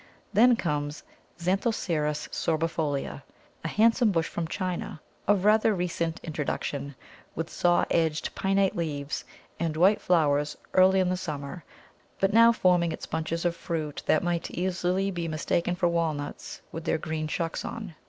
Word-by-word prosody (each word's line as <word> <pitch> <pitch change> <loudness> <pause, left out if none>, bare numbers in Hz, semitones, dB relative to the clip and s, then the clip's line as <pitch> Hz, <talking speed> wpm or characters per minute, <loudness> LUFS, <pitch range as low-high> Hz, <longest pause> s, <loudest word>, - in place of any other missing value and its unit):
Then 245 +3 +6
comes 150 -6 -2 0.3
Xanthoceras 170 -5 0
sorbifolia, 155 -4 -1 0.4
a - - -2
handsome 230 +4 +4
bush 165 -3 +1
from 170 -1 -3
China, 180 -3 -3 0.3
of 200 -1 +3
rather 215 0 +4
recent 170 -2 -2
introduction, 145 -2 -3 0.4
with 165 +1 -4
saw 175 0 +3
edged 160 -2 +1
pinnate 195 0 +1
leaves 150 -4 -3 0.4
and 160 -2 -1
white 190 +5 +4
flowers 150 -4 +2 0.2
earlier 190 0 +5
in 180 - 0
the 185 - 0
summer, 150 -1 -5 0.6
but 195 +1 +2
now 230 +1 +8
forming 180 -6 +3
its - - -6
bunches 160 +2 -3
of 170 -1 +1
fruit 155 -4 -4
that 155 - +3
might 175 -1 -1
easily 185 +2 0
be 170 -2 -3
mistaken 170 +2 0
for 175 0 +2
walnuts 160 -4 -3
with 165 - -6
their 160 - +1
green 155 0 -3
shucks 165 +1 -2
on. 215 -7 -6
170 Hz, 145 wpm, -27 LUFS, 155-185 Hz, 0.6 s, now